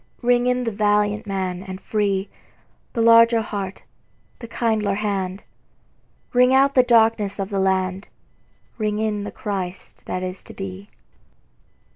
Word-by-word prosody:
Ring 245 0 +3
in 250 0 +1
the 230 - -1
valiant 210 +1 +1
man 185 -2 -3
and 190 -1 -8
free, 200 -2 -1 0.7
The 230 - 0
larger 230 0 +6
heart, 200 -3 -5 0.6
the 235 - -8
kindlier 220 -4 0
hand; 195 -2 -3 0.9
Ring 250 +1 +5
out 275 +1 +4
the 255 - +6
darkenss 225 -4 +3
of 195 -1 -3
the 200 - -1
land, 190 0 0 0.7
Ring 210 -1 -1
in 210 -2 -1
the - - -6
Christ 190 -3 -5
that 185 - -3
is 185 +1 -6
to - - -11
be. 195 +1 -7
205 Hz, 140 wpm, -22 LUFS, 195-230 Hz, 0.9 s, larger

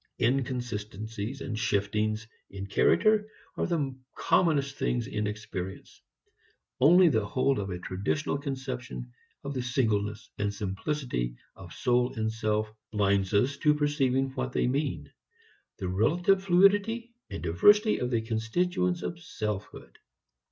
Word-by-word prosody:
Inconsistencies 115 -2 -2
and 115 -6 -4
shiftings 105 +1 0 0.2
in 100 0 -6
character 210 - +3 0.3
are - - -1
the 145 -6 -1 0.2
commonest 140 -5 +2
things 120 -2 0
in 105 -1 -2
experience. 100 -3 -6 0.8
Only 175 +7 +7
the 110 -9 +2
hold 130 +5 +1
of 100 -1 -3
a 90 - -3
traditional 100 +12 -2
conception 130 - -5 0.3
of 140 - -4
the 130 - -2
singleness 110 -4 -1
and 105 0 0
simplicity 100 - -3 0.2
of - - -12
soul 125 0 +1
and 110 0 -1
self 110 -1 -1 0.2
blinds 100 -3 +1
us 130 +7 +2
to 150 0 +3
perceiving 135 -3 +1
what 130 -1 -3
they - - +1
mean: 140 +4 -1 0.7
the 95 - -4
relative 170 - +2
fluidity 205 +6 +3 0.2
and - - -6
diversity 205 - +4
of 125 - -1
the 115 -3 +1
constituents 175 - 0
of 170 - -4
selfhood. 105 - -5
125 Hz, 130 wpm, -28 LUFS, 105-145 Hz, 0.8 s, Only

